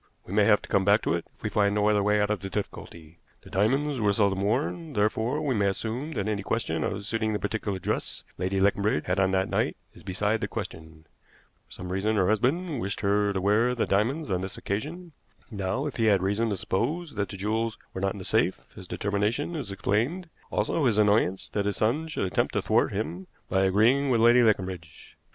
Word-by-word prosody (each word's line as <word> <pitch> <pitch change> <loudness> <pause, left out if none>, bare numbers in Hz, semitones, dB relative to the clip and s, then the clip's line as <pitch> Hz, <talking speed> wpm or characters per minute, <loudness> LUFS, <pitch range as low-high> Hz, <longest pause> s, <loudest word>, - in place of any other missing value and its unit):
"We 95 - -8
may 105 0 +4
have 105 -1 +4
to - - -9
come 95 - +2
back 100 +3 +4
to - - +1
it 85 -1 -3
if - - -27
we 105 - -2
find 100 0 +2
no 105 0 +2
other 105 -1 +3
way 105 +1 +2
out 105 0 +1
of 105 - 0
the 95 - -6
difficulty. 85 -4 -7 0.2
The - - -14
diamonds 135 +7 +1
were 105 -1 +3
seldom 100 -2 +1
worn, 140 - -1
therefore 110 +7 0
we 140 -3 +1
may 100 -3 +2
assume 115 +10 -3
that 100 -5 -2
any 105 -2 -1
question 90 -7 -1
of 100 +3 -3
suiting 110 0 -1
the - - +1
particular 105 -2 -2
dress 95 - -3
Lady 95 +2 0
Leconbridge 100 -4 +2
had 90 +2 0
on 95 -1 +3
that 95 0 +2
night - - 0 0.2
is - - -15
beside 105 +4 -1
the - - -1
question. 80 0 -7 0.6
For - - -32
some 90 0 -7
reason 100 +4 0
her 95 -2 +2
husband 140 - +1
wished 100 +1 -3
her 100 0 +2
to 95 - -1
wear 105 +6 +2
the 120 - 0
diamonds 120 +8 0
on 90 -1 0
this 95 0 -5
occasion. 160 - -4 0.4
Now, 100 +6 -2
if 145 - -4
he 115 - +2
had 100 -4 +4
reason 105 +4 +1
to 100 - -1
suppose 150 - -2
that 100 -3 -2
the 100 - -7
jewels 110 +3 -1 0.2
were 95 - -5
not 95 0 0
in - - -9
the 95 - -7
safe, 110 -4 +2 0.2
his 95 -4 -11
determination 105 - -1
is 140 -10 -4
explained, 125 - -1 0.2
also 110 +8 0
his 110 -3 +2
annoyance 105 -3 +2
that 100 -1 -1
his 105 - -1
son 135 +9 +1
should 155 - -2
attempt 90 - 0
to - - 0
thwart - - +2
him 85 +4 -4 0.2
by 95 0 +3
agreeing 115 +9 +3
with 120 -3 +3
Lady 120 +2 +6
Leconbridge. 95 -7 -1
105 Hz, 225 wpm, -27 LUFS, 95-115 Hz, 0.6 s, Lady